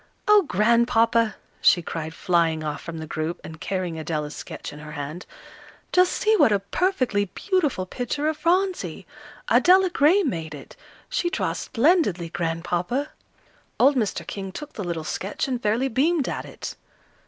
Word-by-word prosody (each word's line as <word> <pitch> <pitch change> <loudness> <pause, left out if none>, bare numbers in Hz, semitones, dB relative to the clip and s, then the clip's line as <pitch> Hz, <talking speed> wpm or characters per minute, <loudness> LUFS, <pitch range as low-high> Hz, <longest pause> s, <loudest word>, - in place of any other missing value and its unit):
"Oh, 420 -1 +7
Grandpapa!" 230 +1 +3 0.3
she 175 - +5
cried, 160 0 -5
flying 165 -3 +1
off 150 -1 -4
from 165 -1 -7
the 160 - -5
group, 155 +2 -3
and 160 0 -10
carrying 180 -4 -3
Adela's 150 -2 -3
sketch - - -7
in 150 - -10
her 150 0 -9
hand. 150 +4 -6 0.6
"Just 365 0 +4
see 435 +1 +2
what 225 - +5
a 205 - +4
perfectly 235 - 0
beautiful 295 - -1
picture 255 +9 -3
of 315 - 0
Phronsie! 360 +4 0 0.4
Adela 370 0 +5
Gray 345 +7 +4
made 165 - -3
it. 140 - -12 0.3
She 345 - -1
draws 375 - -2
splendidly, 230 - +2
Grandpapa." 175 - -2 0.7
Old 280 +2 +5
Mr. 205 -8 -1
King 195 +1 -6
took 295 +9 -8
the 205 - -5
little 170 -3 -3
sketch 190 - -3
and 250 -2 -2
fairly 225 +5 +1
beamed 275 +4 +1
at - - -3
it. - - -7
210 Hz, 155 wpm, -24 LUFS, -, 0.7 s, Oh